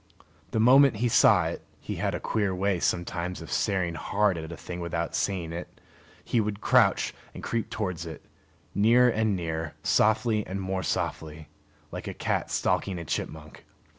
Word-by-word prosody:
The 110 - -1
moment 130 +2 +6
he 120 +4 0
saw 115 - +5
it - - -4 0.2
(he - - -5
had - - -1
a - - -3
queer 100 -4 -1
way 95 0 0
sometimes 85 +1 -2
of 80 - -9
staring 95 -5 0
hard 100 +5 +1
at 80 0 -6
a 85 - -7
thing 90 0 -7
without 85 -1 -3
seeing 90 -5 -1
it) 85 +1 -8 0.5
he 120 - +2
would 105 -1 -3
crouch - - +3 0.2
and - - -8
creep 115 -1 -2
towards 90 -6 -3
it, 80 - -9 0.5
nearer 120 +4 +5
and 110 -2 +1
nearer, 80 -2 -4
softly 110 0 +2
and 95 +1 -4
more 95 0 -2
softly, 80 -3 -3 0.4
like - - -6
a - - -5
cat - - -1
stalking 95 -3 0
a 85 - -6
chipmunk. 75 0 -5
95 Hz, 170 wpm, -27 LUFS, 85-110 Hz, 0.5 s, moment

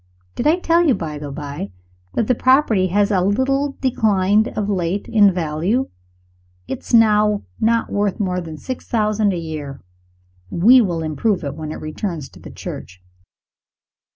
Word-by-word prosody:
Did - - -1
I 320 +3 +4
tell 340 -1 +2
you, 270 - +4
by 155 -5 -5
the 145 -1 -6
by, 140 -7 -6 0.5
that 230 - +1
the 250 - +2
property 250 -6 +3
has 200 +3 +1
a 190 -3 +2
little 270 +8 0
declined 215 -4 +2
of 210 -1 -1
late 190 -1 -1
in 210 -4 +5
value? 175 +9 -1 0.8
It - - -4
is - - -11
now 210 -2 +4 0.2
not 230 +1 +1
worth 205 -2 -1
more 180 -3 -1
than 160 -2 -8
six 255 - -7
thousand 215 -2 +1
a 180 - -2
year. 155 -4 -6 0.7
We 235 - +6
will 170 -6 -1
improve 175 +5 -1
it 140 -2 -3
when 155 0 -6
it - - -5
returns 155 -1 -5
to - - -16
the - - -11
Church. 90 +1 -8
200 Hz, 165 wpm, -20 LUFS, 165-225 Hz, 0.8 s, We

